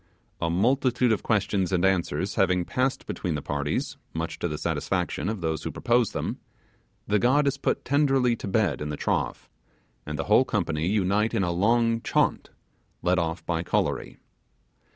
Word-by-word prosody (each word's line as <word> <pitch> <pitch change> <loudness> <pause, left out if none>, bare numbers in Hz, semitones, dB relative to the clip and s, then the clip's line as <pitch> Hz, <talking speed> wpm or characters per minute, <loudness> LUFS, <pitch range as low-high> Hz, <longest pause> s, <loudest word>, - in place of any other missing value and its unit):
A 85 - +1
multitude 125 - +2
of 110 - +1
questions 100 -4 0
and 95 0 +2
answers 95 -1 0
having 90 -2 +2
passed 130 +6 -1
between 90 -5 -3
the 75 - -3
parties, 80 - -2 0.2
much 80 0 -3
to - - -1
the 75 -2 -4
satisfaction 90 - -1
of 110 -4 -4
those 80 -2 -1
who - - -4
propose 120 -2 +1
them, - - -4 0.7
the 105 0 +2
god 135 +7 +3
is 140 0 0
put - - -1
tenderly 135 -4 +3
to - - -6
bed 95 - +1
in 75 - -3
the 75 - -4
trough, - - -2 0.6
and 75 0 -5
the 70 - -1
whole 105 +5 +5
company 85 -9 -1
unite 105 +2 +1
in 95 - +2
a 90 - 0
long 115 +5 +2
chant, - - 0 0.5
led 90 +1 +3
off 80 -1 -3
by 85 -2 -1
Kolory. 85 - -1
95 Hz, 175 wpm, -26 LUFS, 85-120 Hz, 0.7 s, whole